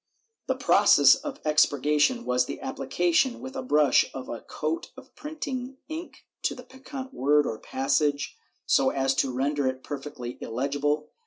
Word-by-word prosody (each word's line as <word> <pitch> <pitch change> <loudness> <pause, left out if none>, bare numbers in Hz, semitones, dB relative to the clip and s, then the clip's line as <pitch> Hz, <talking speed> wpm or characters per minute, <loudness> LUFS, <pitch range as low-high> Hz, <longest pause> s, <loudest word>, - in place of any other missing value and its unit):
The - - +1
process - - +6
of 290 -2 -5
expurgation 150 - +2
was 125 0 +1
the - - -6
application 175 - 0
with 260 +1 -8
a 265 - -3
brush 150 - +4
of 130 - -7
a 120 - -5
coat 155 +2 -4
of - - -14
printing 270 -4 -5
ink 320 +2 -8 0.2
to - - -1
the 250 - -10
peccant 265 +1 -9
word 145 +2 +3
or 110 - -4
passage, 140 +2 0 0.3
so 135 - +3
as 135 -1 +1
to 135 0 0
render 140 +2 0
it 130 0 -3
perfectly 135 -4 -7
illegible. 145 +5 -1
150 Hz, 155 wpm, -26 LUFS, -, 0.3 s, process